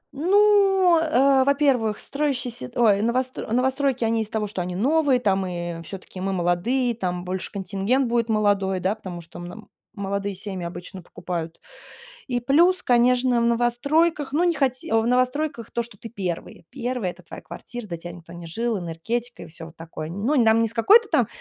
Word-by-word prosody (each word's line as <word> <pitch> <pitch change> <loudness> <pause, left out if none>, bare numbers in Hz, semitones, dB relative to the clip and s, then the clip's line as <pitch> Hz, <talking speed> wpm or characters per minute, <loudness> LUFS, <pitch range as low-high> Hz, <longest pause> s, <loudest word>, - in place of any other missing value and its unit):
Ну, 385 0 +4
э, 275 -4 +4
во-первых, 265 -6 +2
строящиеся, 255 - -3
т - - -7
ой, 205 -4 +4
новост 255 +3 0
новостройки, 260 +2 0
они 225 0 +1
из-за 215 - -6
того, 220 -2 -1
что 200 -3 -4
они 180 0 -4
новые, 275 - +2
там 195 -4 +1
и 175 -1 -5
всё-таки 185 +2 -9
мы 195 0 -1
молодые, 190 +9 +1
там 180 -5 -3
больше 185 0 -3
контингент 200 +6 0
будет 235 -1 0
молодой, 200 -3 +1
да, 190 +3 0
потому 185 -5 -8
что 170 +1 -11
мн 180 +5 -9 0.3
молодые 200 0 -3
семьи 190 -2 -5
обычно 180 +2 -7
покупают. 165 -1 -6 0.7
И 245 -2 -1
плюс, 330 +9 +3
конечно, 245 0 +3
в - - +1
новостройках, 270 +6 +1
ну, 330 +4 +2
не 345 -1 +2
хоте 260 -5 -1
в 225 0 +3
новостройках 255 +1 0
то, 235 - -2
что 235 - -9
ты 235 - -8
первый 180 -5 -5
первый, 245 -6 -3
это 180 +1 -14
твоя 170 - -10
квартира, 240 -2 -8
до 175 -4 -5
тебя 175 +1 -8
никто 170 0 -12
не 170 -1 -9
жил, 225 +6 -1
энергетика 225 +9 -4
и - - -8
всё 160 0 -8
вот 165 0 -13
такое. 165 -1 -7
Ну, 210 - -1
нам 225 0 +4
не 230 - +2
с 225 - -5
какой-то 415 - +5
там, - - +2
230 Hz, 185 wpm, -24 LUFS, 185-260 Hz, 0.7 s, какой-то